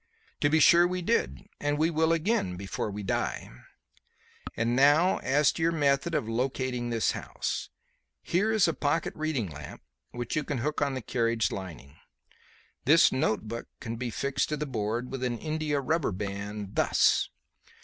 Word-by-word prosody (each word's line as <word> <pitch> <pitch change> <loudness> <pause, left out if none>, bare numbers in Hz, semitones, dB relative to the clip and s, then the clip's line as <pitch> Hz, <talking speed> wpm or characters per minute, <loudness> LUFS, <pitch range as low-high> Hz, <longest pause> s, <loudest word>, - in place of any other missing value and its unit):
"To 145 - +3
be 160 +2 +3
sure 170 +2 +7
we 180 0 -3
did; 70 - 0
and 145 0 0
we 160 +2 +2
will 160 0 +2
again 165 - 0
before 100 +2 -4
we 105 0 -6
die. 95 - -2 1.1
And 115 +1 +1
now 145 +7 +4
as 145 +2 +3
to - - -6
your 165 +1 +3
method 145 +1 +1
of 110 - -1
locating 125 +1 -2
this 115 -2 +1
house. - - -4 0.5
Here 200 +6 +1
is 215 -5 +4
a 165 - +1
pocket 150 +3 -1
reading 155 -9 -1
lamp 75 -1 -10 0.3
which 120 -1 -4
you 155 - 0
can 140 -1 -3
hook 150 +5 -2
on 140 -2 +1
the 130 - -5
carriage 115 -1 0
lining. 80 -7 -8 0.9
This 165 +5 +6
notebook 115 -2 -1
can 115 -1 -5
be 120 +1 -3
fixed 140 +3 -1
to 150 - -1
the 150 - -2
board 120 -1 -3
with 135 -1 -4
an 120 -2 -1
india 155 0 -1
rubber 150 -1 0
band 100 +1 -5
thus. - - +3
135 Hz, 170 wpm, -28 LUFS, 115-155 Hz, 1.1 s, sure